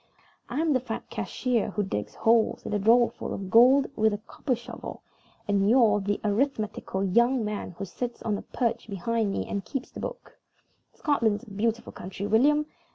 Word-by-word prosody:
I'm 305 +4 +1
the 260 - +3
fat 235 -3 -6
cashier 250 -4 -1
who 210 - -1
digs 105 - -4
holes 225 0 +2
in - - -3
a 205 - +1
drawerful 235 +4 +3
of 190 -1 -6
gold 255 +4 +7
with 220 -1 +2
a - - -4
copper 250 +5 -3
shovel, 240 +2 -9 0.4
and 200 0 +2
you're 225 -4 +5
the 205 +1 -1
arithmetical 215 -3 -1
young 235 +5 +3
man 210 -4 -4
who 200 - -4
sits 240 +5 -5
on 215 -2 0
a - - -4
perch 230 -2 -2
behind 210 +2 -1
me - - -2
and 200 -1 -3
keeps 270 +4 -5
the - - -9
books. - - -6 0.6
Scotland's 230 -8 +1
a 225 - -13
beautiful 225 +3 -2
country, 190 +2 -6
William. 285 +8 +4
225 Hz, 175 wpm, -27 LUFS, 205-250 Hz, 0.6 s, gold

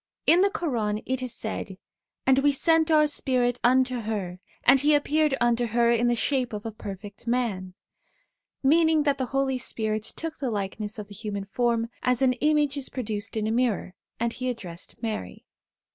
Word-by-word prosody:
In 345 +2 +6
the 400 - +4
Quran 235 - -2
it 260 0 -2
is 255 -1 -3
said: 215 -4 -5 0.2
' - - -63
And 265 0 +5
We 285 +1 +4
sent 325 +3 +3
Our 305 -1 +5
Spirit 250 -4 +1
unto 255 +1 +3
her, 205 -5 -4 0.2
and 270 +2 +6
he 295 +2 +4
appeared 295 -1 +2
unto 240 0 +2
her 235 +1 +3
in 235 +1 +2
the 240 - +3
shape 255 -1 0
of 210 0 -5
a 225 - -3
perfect 205 +1 -9
man,' 210 -7 -1 0.9
1 265 - +4
meaning 320 -1 +4
that 285 -2 +1
the 260 - -1
Holy 270 0 0
Spirit 220 -2 -2
took 320 +8 -5
the 265 - -1
likeness 210 0 -3
of 210 -2 -6
the 205 - -12
human 200 -1 -5
form, 230 +2 0
as 250 +1 +1
an 255 -1 +4
image 295 +2 +1
is 275 - -4
produced 220 -3 -4
in 215 - 0
a 220 - 0
mirror, 230 -6 0 0.3
and 235 0 0
he 255 0 -3
addressed 195 -1 -7
Mary. 220 -2 -4
240 Hz, 190 wpm, -26 LUFS, 215-275 Hz, 0.9 s, In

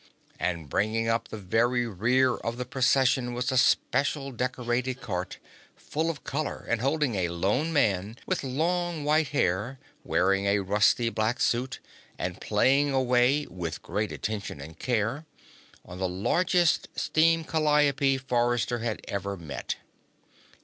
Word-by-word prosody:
And 85 -4 -2
bringing 110 +9 0
up 115 0 0
the - - -7
very 120 +5 +1
rear 120 +5 +2
of 115 +1 -4
the 125 - -3
Procession 130 -1 +2
was 125 +1 -1
a 130 - +1
special 140 +2 +1
decorated 125 0 -2
cart, 90 -7 -4 0.4
full 160 +2 -2
of 150 -4 -5
color 145 +1 -3
and 120 -1 0
holding 140 -1 +1
a 90 -4 0
lone 100 - 0
man 105 - +1
with - - -1
long 165 +4 -1
white 150 +1 +2
hair, 115 -1 0 0.3
wearing 100 +1 +1
a 100 0 +2
rusty 105 +4 +3
black 115 +2 -1
suit 125 +2 0 0.4
and - - -4
playing 140 +2 +3
away, 130 +2 +3
with 85 -3 -6
great 105 +1 -2
attention 105 -8 -4
and 80 +4 -10
care, 120 +5 -1 0.6
on 90 +1 -9
the 95 -1 0
largest 170 - +2
steam 165 +1 +2
calliope 150 -3 +2
Forrester 120 -2 0
had 115 -1 -3
ever 100 0 -3
met. 80 -5 -5
120 Hz, 140 wpm, -27 LUFS, 105-140 Hz, 0.6 s, rusty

